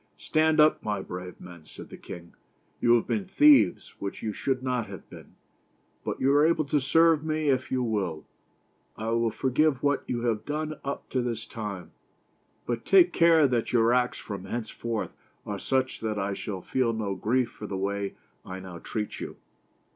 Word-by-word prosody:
"Stand 155 0 +2
up, 155 0 +5
my 105 -2 -2
brave 90 -1 -7
men," 85 -3 -12
said - - -12
the - - -7
king. 85 0 -10 0.5
"You 120 0 +5
have 115 - +1
been 205 -3 -1
thieves, 285 0 +5
which 100 - -5
you 110 - -2
should 130 +2 -1
not 125 -3 -1
have - - -10
been, - - -13 0.7
but - - -3
you 135 +1 +3
are 145 +1 +5
able 160 -1 +3
to 145 +1 +1
serve 160 +3 +4
me 155 -1 0
if 130 -1 0
you 130 -1 +1
will. 100 -9 -2 0.7
I 110 +1 -3
will 115 0 +2
forgive 135 +3 +1
what 145 0 +2
you 120 -1 -2
have 110 -3 0
done 155 +1 -3
up 140 0 -4
to 130 - 0
this 115 -2 -3
time, 100 -6 -6 0.7
but 120 -1 -2
take 180 -3 +5
care 165 -3 +5
that 120 -2 -1
your 115 0 +4
acts 125 0 +1
from 100 -3 -7
hence 110 +2 -4
forth 115 -2 -3 0.3
are 100 -1 -4
such 130 +2 0
that 110 -1 -2
I 100 0 -1
shall 95 -1 -5
feel 125 -3 0
no 105 -3 -2
grief 120 +5 0
for 105 - -8
the 95 - -4
way 100 +1 -2 0.3
I 95 0 -7
now 95 -2 -9
treat 105 +3 -4
you." - - -6
120 Hz, 190 wpm, -27 LUFS, 105-145 Hz, 0.7 s, up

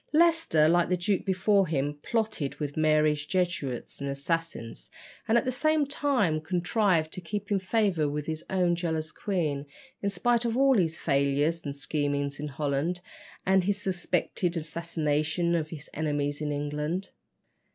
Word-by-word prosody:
Leicester, 325 - +4
like 170 +1 +3
the 180 - +2
duke 190 +2 0
before 195 0 +3
him, 145 -2 0
plotted 220 -11 -1
with 145 -2 -4
Mary's 155 -1 +3
Jesuits 170 -7 -2
and 140 - -2
assassins, 140 - -3 0.4
and 225 - +4
at - - +1
the 255 - +1
same 310 +3 +2
time 260 - +1
contrived 180 -1 +1
to 185 - -6
keep 205 +4 -5
in 200 - +3
favour 185 -6 +1
with 150 0 -3
his 160 0 -4
own 180 -2 +2
jealous 160 -2 -2
queen, 155 -8 -1 0.4
in 200 - 0
spite 235 +5 +1
of 235 0 0
all 270 0 +5
his 165 -6 +1
failures 140 +3 +1
and 140 -1 -4
schemings 145 -1 -1
in 150 - -3
Holland, 145 +4 -1 0.5
and 190 -1 +3
his 205 +1 0
suspected 180 -2 -1
assassinations 160 +1 -1
of 155 -2 -1
his 155 -2 -8
enemies 145 -1 -1
in 150 -1 -1
England. 150 +5 -2
165 Hz, 155 wpm, -28 LUFS, 150-195 Hz, 0.5 s, all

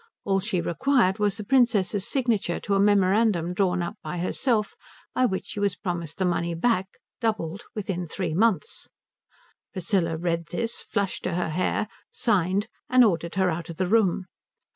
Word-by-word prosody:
All 195 -1 +2
she 190 -2 -1
required 205 - +2
was 205 -1 +1
the 215 - -5
Princess's 205 -5 +2
signature 230 -10 0
to 200 - -1
a 195 - +3
memorandum 200 -2 +3
drawn 180 -2 +1
up 205 +6 -5
by 180 - -5
herself 210 +5 0 0.4
by 255 - +3
which 190 -5 -1
she - - -6
was 200 -2 +1
promised 170 -5 -4
the 190 - 0
money 170 -1 0
back, 190 +1 +1 0.3
doubled, 210 -6 -2
within 190 -4 -3
three 165 0 -3
months. 230 - 0 0.9
Priscilla 175 -3 0
read 170 0 -1
this, 230 +7 -3
flushed 200 -3 -2
to 180 - -1
her 180 -2 -1
hair, 185 +6 0 0.2
signed, 200 -1 +1 0.2
and 255 0 +6
ordered 170 -4 0
her 190 -1 +2
out 165 +1 -5
of 165 - -7
the 185 - +1
room. 195 -2 +2
190 Hz, 165 wpm, -26 LUFS, 175-215 Hz, 0.9 s, and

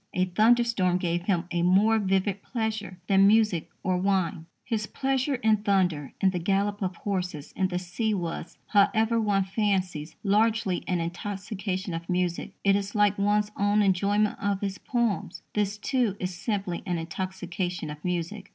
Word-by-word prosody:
A 185 - +3
thunderstorm 215 -1 +3
gave 175 -1 -1
him 180 -4 +1
"a 175 - 0
more 200 +6 +4
vivid 195 0 0
pleasure 220 -5 -3
than 195 0 +5
music 210 -5 +3
or 185 0 +1
wine." 185 -3 0 0.2
His 215 -3 -2
pleasure 270 +1 0
in 220 -3 +3
thunder, 185 -8 0
in 190 - +3
the 180 - -2
gallop 200 +3 0
of 185 -2 -2
horses, 180 -7 -3
in 190 - +1
the 180 -1 -3
sea, 185 +5 -2
was, 170 -2 -5
however, 225 +2 +3
one 200 -2 +2
fancies, 190 -6 -1
largely 215 -2 +2
an 180 -2 0
intoxication 190 +2 -4
of 165 +1 -6
music. 180 -1 -1
It 195 0 +4
is 200 +1 -2
like 205 -1 +3
one's 210 +1 +2
own 205 +1 +2
enjoyment 200 +2 +2
of 200 -1 0
his 200 -1 -3
poems. 235 -5 -1
This, 205 0 0
too, 235 -2 0
is 185 0 -3
simply 195 -2 -2
an 175 -1 0
intoxication 180 -1 -4
of 150 0 -10
music. 180 +3 -3
195 Hz, 160 wpm, -27 LUFS, 180-210 Hz, 0.2 s, than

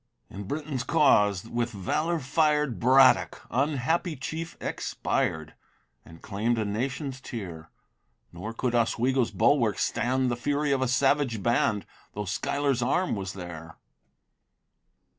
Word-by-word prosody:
In 100 +1 -7
Britain's 145 +1 -3
cause, 105 - +3
with 120 0 -1
valor 155 - -1
fired, 150 -2 +1
Braddock, 130 +1 +4
unhappy 150 +5 0
chief! 160 +4 -6
expired, 80 0 -2 0.5
And 80 0 -15
claim'd 110 +3 -1
a 110 - 0
nation's 130 +5 -3
tear; 85 -11 -7 0.6
Nor 95 +6 -6
could 120 +1 -2
Oswego's 120 +2 +1
bulwarks 110 +1 +2
stand 130 +1 0
The - - 0
fury 145 +4 -1
of 135 -1 +1
a 130 - +1
savage 135 -4 +1
band, 115 -3 +1 0.3
Though 105 0 -4
Schuyler's 135 +6 -1
arm 175 +8 +1
was 95 -1 -5
there. 85 -3 -9
125 Hz, 120 wpm, -27 LUFS, 105-140 Hz, 0.6 s, Braddock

